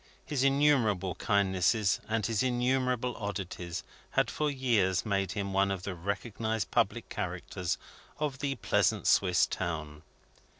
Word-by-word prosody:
His 140 -4 -1
innumerable 135 - +3
kindnesses 100 +1 +2
and 110 -1 0
his 115 -3 +1
innumerable 125 -1 +1
oddities 95 -5 -4 0.3
had - - +1
for 150 -1 0
years 115 -9 +1
made 100 -3 0
him 100 -1 -3
one 100 0 +3
of 95 -2 -3
the 100 - -3
recognised 105 +4 -3
public - - +1
characters 90 -1 -3 0.4
of 145 -3 -2
the 140 -1 -1
pleasant 120 - +1
Swiss 90 -3 +4
town. 75 -3 -4
105 Hz, 130 wpm, -30 LUFS, 95-125 Hz, 0.4 s, Swiss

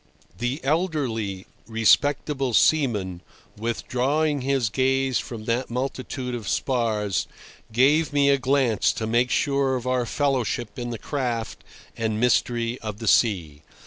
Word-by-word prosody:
The 120 +5 -2
elderly, 135 - -1 0.2
respectable 135 +3 +2
seaman, 105 - +2 0.3
withdrawing 130 +6 -1
his 135 -3 +1
gaze 135 +1 +1
from 110 -3 -7
that 120 +3 -1
multitude 130 0 -4
of 120 -3 -4
spars, 110 -7 0 0.4
gave 145 +7 +3
me 140 -1 +3
a 140 - +3
glance 130 -4 +2
to 110 - -3
make 120 +3 +2
sure 140 -1 +1
of 125 -1 -4
our 125 -1 0
fellowship 125 -5 -1
in 120 0 -4
the 115 - -4
craft 120 -3 -3 0.3
and 110 -1 -2
mystery 120 0 +1
of 105 -2 -6
the 115 0 -6
sea. 85 -11 +2
125 Hz, 130 wpm, -24 LUFS, 110-135 Hz, 0.4 s, gave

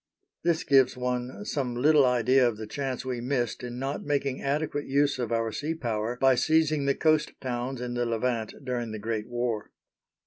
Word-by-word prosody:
This 170 -2 +1
gives 135 -3 +4
one 125 +8 -3
some 130 - -2
little 145 +2 +5
idea 125 +1 +4
of 115 -3 -2
the 110 - -6
chance 130 +3 -4
we 125 -2 -3
missed 120 -2 -1
in 120 0 -5
not 135 +2 -3
making 140 -2 -1
adequate 145 +1 -1
use 140 0 +2
of 120 -2 -2
our 115 -1 0
sea 155 +8 -3
power 115 -4 -2
by 135 0 +5
seizing 155 +1 +2
the 140 - +2
coast 155 -1 +2
towns 125 0 -3
in 125 0 -4
the 120 0 0
Levant 115 -1 -1
during 120 -3 -2
the - - -4
Great 110 0 -3
War. 120 -3 -2
125 Hz, 185 wpm, -27 LUFS, 120-140 Hz, -, little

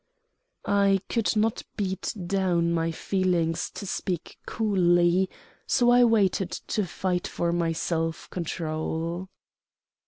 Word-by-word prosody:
I 200 -1 +3
could 230 -1 +1
not 215 +1 +1 0.2
beat 190 -2 -2
down 175 -3 +1
my 165 0 +1
feelings 170 -1 0
to 200 - -6
speak 185 -2 -4
coolly; 180 -3 +3 0.4
so 245 -1 +4
I 245 0 +6
waited 200 -5 +2
to 205 0 -3
fight 180 +1 -2
for 170 0 -1
my 170 -1 +1
self 165 0 -2
control. 165 +1 -3
180 Hz, 115 wpm, -26 LUFS, 170-200 Hz, 0.4 s, I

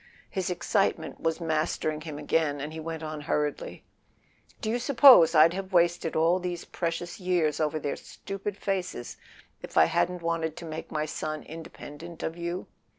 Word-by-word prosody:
His 190 -2 -2
excitement 180 -2 0
was 165 -1 0
mas¬ 160 -2 0
tering 155 0 -2
him 155 -2 -6
again, 150 -1 0
and 150 +3 -5
he 160 - -6
went 160 0 -5
on 155 -1 -5
hurriedly: 150 -1 -2 0.8
"Do 220 - -2
you 240 - 0
suppose 250 - +7
I'd 160 +2 +7
have 190 +1 -5
wasted 175 -1 +2
all 165 +3 +3
these 175 -1 -4
precious 175 +3 -4
years 175 -5 +1
over 155 0 0
their 145 -1 -2
stupid 195 0 -6
faces 185 -13 -3 0.4
if - - -8
I - - +8
hadn't 175 - 0
wanted 165 -1 -1
to 170 - -7
make 160 0 -7
my 155 0 -1
son 155 0 -4
independent 165 +1 -9
of 160 - -2
you 170 +1 -4
165 Hz, 170 wpm, -28 LUFS, 155-180 Hz, 0.8 s, I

